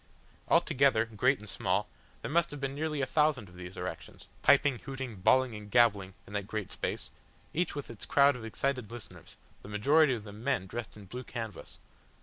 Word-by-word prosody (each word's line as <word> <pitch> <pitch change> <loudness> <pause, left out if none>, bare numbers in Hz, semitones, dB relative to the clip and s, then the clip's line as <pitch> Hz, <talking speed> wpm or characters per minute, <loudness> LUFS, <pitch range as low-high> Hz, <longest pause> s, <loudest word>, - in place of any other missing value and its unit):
Altogether, 130 -4 +4
great 120 +5 +2
and 105 - -12
small, - - 0 0.4
there - - -4
must 170 +1 +3
have 145 - -7
been 135 0 -2
nearly 150 0 -2
a - - +2
thousand 150 -7 +2
of 90 - -16
these 90 +1 -9
erections, - - -7
piping, 140 -3 +4
hooting, 135 -5 -6
bawling 130 +6 +3
and 105 -1 -8
gabbling 100 -5 +3
in 100 - -12
that 100 -1 -2
great 105 -3 -4
space, - - -4 0.4
each 175 0 0
with 145 - -5
its 115 - -8
crowd 140 -1 +5
of 125 - -8
excited 125 +1 -2
listeners, 120 -2 -10 0.3
the - - -11
majority 135 +7 +4
of 110 - -7
them 105 +1 -10
men 135 -8 +1
dressed 115 +3 -6
in 105 - -11
blue 125 +7 -7
canvas. 115 -5 -7
120 Hz, 190 wpm, -31 LUFS, 105-140 Hz, 0.4 s, crowd